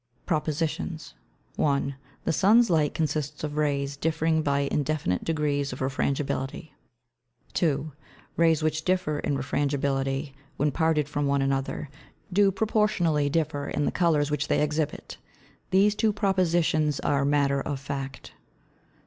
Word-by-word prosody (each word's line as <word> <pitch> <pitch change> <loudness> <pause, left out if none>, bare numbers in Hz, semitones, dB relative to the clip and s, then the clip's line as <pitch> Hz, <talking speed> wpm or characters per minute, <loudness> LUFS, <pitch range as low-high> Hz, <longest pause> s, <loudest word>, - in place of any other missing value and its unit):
PROPOSITIONS. 160 - -2 0.4
1. 140 -1 +1 0.3
The - - 0
Sun's 215 +5 +5
Light 155 -3 +2
consists 150 -1 -2
of 150 -1 -3
Rays 140 -2 0
differing 160 +1 +1
by 140 -2 +1
indefinite 140 -9 -1
Degrees 145 -3 0
of 125 - -6
Refrangibility. 135 +2 -2 0.8
2. 155 -2 0 0.4
Rays 165 -2 +3
which 155 0 0
differ 180 -5 0
in 145 -1 -1
Refrangibility, 135 0 -1 0.2
when 150 +1 +1
parted 160 -1 +1
from 145 -1 -1
one 140 0 +2
another, 135 +2 -1 0.5
do 200 +1 +5
proportionally 190 -8 +1
differ 150 -2 -1
in 145 - -1
the - - +1
Colours 155 -4 +2
which 150 0 -1
they - - +2
exhibit. 150 0 -2 0.5
These 200 +2 +4
Two 215 +1 +2
Propositions 175 -7 +1
are 140 -1 +1
Matter 140 -1 +2
of 140 -1 -3
Fact. 135 0 -6
150 Hz, 130 wpm, -26 LUFS, 140-165 Hz, 0.8 s, Sun's